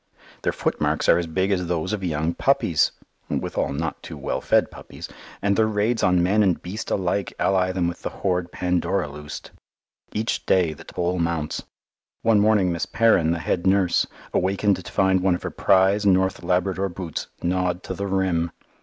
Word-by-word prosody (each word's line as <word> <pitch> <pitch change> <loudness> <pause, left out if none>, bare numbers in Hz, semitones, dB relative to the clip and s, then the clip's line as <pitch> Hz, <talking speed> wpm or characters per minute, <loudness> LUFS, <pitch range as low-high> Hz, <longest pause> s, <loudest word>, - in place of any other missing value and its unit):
Their - - +1
footmarks - - -1
are 85 - +6
as 85 - -3
big 95 +4 0
as 90 -2 0
those 85 +3 -1
of 100 -3 -3
young 80 -1 -1
puppies - - +2 0.4
(withal - - -1
not 75 +2 -3
too - - -8
well - - -3
fed - - +2
puppies), - - -10 0.4
and 100 0 +2
their 110 +1 +3
raids 110 +2 0
on 90 -1 +3
man 100 +4 +3
and 95 -4 +2
beast 100 +5 -6
alike 95 0 -1
ally 95 -1 +2
them 90 -2 0
with 85 - -5
the - - -3
horde 90 -2 -2
Pandora 90 0 0
loosed. 75 +1 -9 0.6
Each 110 +2 -2
day 90 -4 +3
the - - -13
toll 90 0 -2
mounts. 85 -2 -1 0.6
One 115 -2 +4
morning 105 -3 +3
Miss 85 0 -2
Perrin, 110 -8 +3
the 85 - +1
head 85 +2 -1
nurse, 95 -2 +3 0.3
awakened 95 +1 +1
to - - -9
find 95 -1 +3
one 95 -1 +3
of - - -7
her - - -3
prize 95 +2 +3
North 95 -1 +2
Labrador 90 +2 0
boots 85 -3 -5 0.2
gnawed 90 0 0
to - - -4
the 100 +2 -4
rim. 95 -3 0
90 Hz, 180 wpm, -23 LUFS, 85-100 Hz, 0.6 s, are